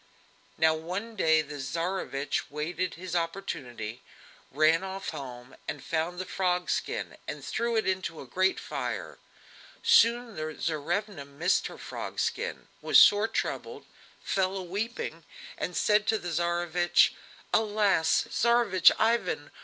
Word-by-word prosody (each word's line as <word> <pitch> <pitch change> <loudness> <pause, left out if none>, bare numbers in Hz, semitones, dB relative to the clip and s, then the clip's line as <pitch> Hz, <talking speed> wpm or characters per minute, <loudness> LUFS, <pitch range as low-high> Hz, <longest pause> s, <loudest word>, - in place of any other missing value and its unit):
Now 160 0 +4
one 185 +8 -5
day 160 -5 +3
the 150 -1 -8
Tsarevich 145 -1 -2
waited 170 +5 -3
his 180 +1 -6
opportunity, 125 - -4 0.5
ran 155 +5 +3
off 190 0 -5
home, 125 -1 -8 0.2
found 165 +4 -2
the 185 - -4
frog 180 -1 0
skin - - -3
and - - -6
threw 235 0 -1
it 220 - +1
into 185 -4 -2
a - - -8
great 185 +9 +1
fire. - - -5 0.6
Soon 240 - +4
the 155 0 -4
Tsarevna 170 +3 -2
missed 145 +6 0
her - - -10
frog - - -6
skin, - - -2
was - - +6
sore 205 +2 +6
troubled, - - -3 0.4
fell 190 0 0
a 190 - -4
weeping, 195 -3 -4 0.3
and 180 - -4
said 210 0 +3
to 220 - +3
the 175 - -5
Tsarevich: 175 +1 +2 0.4
"Alas! 210 -6 +3
Tsarevich 235 -6 +4
Ivan! 225 -9 0
180 Hz, 130 wpm, -28 LUFS, 155-205 Hz, 0.6 s, was